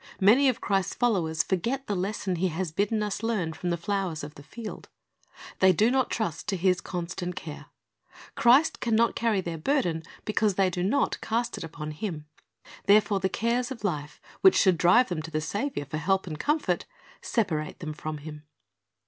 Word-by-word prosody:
Many 245 +8 +6
of 245 -2 -2
Christ's 195 -1 0
followers 175 -10 +1
forget 235 +9 -1
the 205 - -2
lesson 190 -1 -2
He 185 +3 +1
has 175 0 -3
bidden 210 +5 0
us 210 -1 -3
learn 210 -8 -1
from 175 - -4
the 170 - 0
flowers 185 -3 -2
of 145 0 -7
the 145 - -13
field. 220 +9 -9 0.7
They 190 0 +6
do 215 +7 +3
not 260 -1 +2
trust 215 -9 -3
to 195 - 0
His 180 0 +2
constant 180 0 -4
care. 155 -4 -8 0.7
Christ 260 +7 +4
can 230 -2 +1
not 230 +1 +3
carry 225 -4 +1
their 170 -3 -5
burden, 175 - 0 0.2
because 215 -2 +1
they 190 -1 +2
do 180 - -3
not 220 +10 +1
cast 235 +2 -1
it - - -6
upon 155 -1 -6
Him. 155 -2 -5 0.6
Therefore 205 0 +5
the 190 0 0
cares 235 +4 0
of 260 -5 -8
life, 150 -6 -3 0.2
which 380 - +7
should 185 -4 +4
drive 190 +8 +5
them 175 -3 -2
to 160 - -7
the 155 -1 -1
Saviour 205 - -3
for 150 +3 -4
help 190 +5 +1
and 155 -4 -6
comfort, 295 - 0 0.4
separate 160 -10 -1
them 155 -2 -5
from 155 0 -5
Him. 150 0 -9
190 Hz, 190 wpm, -27 LUFS, 165-225 Hz, 0.7 s, which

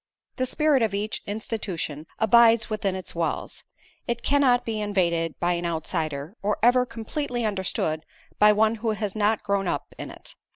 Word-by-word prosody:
The 255 - 0
spirit 300 -1 +3
of 215 -3 +1
each 210 +2 -3
institution 195 -8 -4
abides 230 0 +5
within 200 -3 -1
its 185 -2 -5
walls. 170 -1 -3 0.4
It 235 -1 -2
cannot 265 -4 +3
be 220 -2 -2
invaded 170 -6 0
by 175 +1 +1
an 175 0 -3
outsider, 160 0 -3
or 210 +1 0
ever 250 +1 +5
completely 240 +1 -3
understood 190 -6 -1 0.4
by 210 0 +7
one 215 +1 +3
who 225 +1 -2
has 210 -1 -3
not 215 0 +1
grown 200 -2 0
up - - -3
in - - -6
it. - - -11
210 Hz, 165 wpm, -25 LUFS, 175-230 Hz, 0.4 s, by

